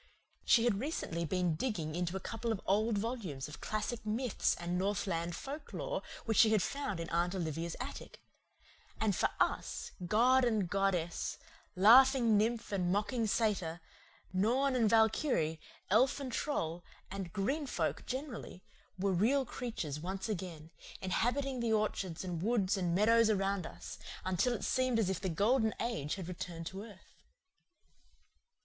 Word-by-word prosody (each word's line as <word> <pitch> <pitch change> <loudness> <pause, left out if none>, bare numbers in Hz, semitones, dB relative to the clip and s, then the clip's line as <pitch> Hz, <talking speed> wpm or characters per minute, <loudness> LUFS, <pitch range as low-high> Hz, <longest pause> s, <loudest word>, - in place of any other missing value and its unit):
She 230 - +5
had 230 -5 +2
recently 210 - -2
been 180 +1 +1
digging 160 -5 -2
into 175 +2 -1
a - - -4
couple 225 +3 -3
of 220 - -1
old 215 +2 +2
volumes 200 - -3
of 150 - -10
classic 225 +2 -3
myths 225 +2 0
and 175 +1 -3
northland 180 -3 -1
folklore 315 - -5 0.2
which 225 -3 +2
she 225 - +8
had 215 -4 +3
found 245 -10 -3
in 165 - -4
Aunt 175 +2 +1
Olivia's 165 -1 -3
attic; 260 +3 -7 0.8
and 215 -3 +1
for - - +2
us, - - -1 0.2
god 250 +6 +4
and 220 -6 +2
goddess, 180 -3 0 0.4
laughing 235 +3 +7
nymph 225 +2 +1
and 180 -3 0
mocking 220 +4 0
satyr, 200 -7 0 0.5
norn 250 +8 +2
and 230 -4 +3
valkyrie, 220 - +2 0.3
elf 255 +7 +4
and 270 -3 -4
troll, 175 - -2 0.3
and 195 -3 -5
"green 270 +9 -1
folk" - - -1
generally, 255 -8 -5 0.3
were 195 +1 +1
real 255 +10 +3
creatures 220 - -4
once 190 +5 -4
again, 175 -6 -5 0.3
inhabiting 250 +8 0
the 230 -2 +1
orchards 195 -5 -1
and 175 -3 -4
woods 205 -2 +2
and 175 -3 0
meadows 225 +3 +5
around 195 -3 0
us, - - -9 0.3
until 185 +7 +1
it 230 - -4
seemed 255 -2 +1
as 205 -4 +2
if 185 - -3
the 190 - -1
Golden 220 +6 +2
Age 150 -11 -2
had 185 -4 -6
returned 175 -2 -6
to 190 +3 -6
earth. 205 -3 -14
205 Hz, 150 wpm, -33 LUFS, 180-235 Hz, 0.8 s, she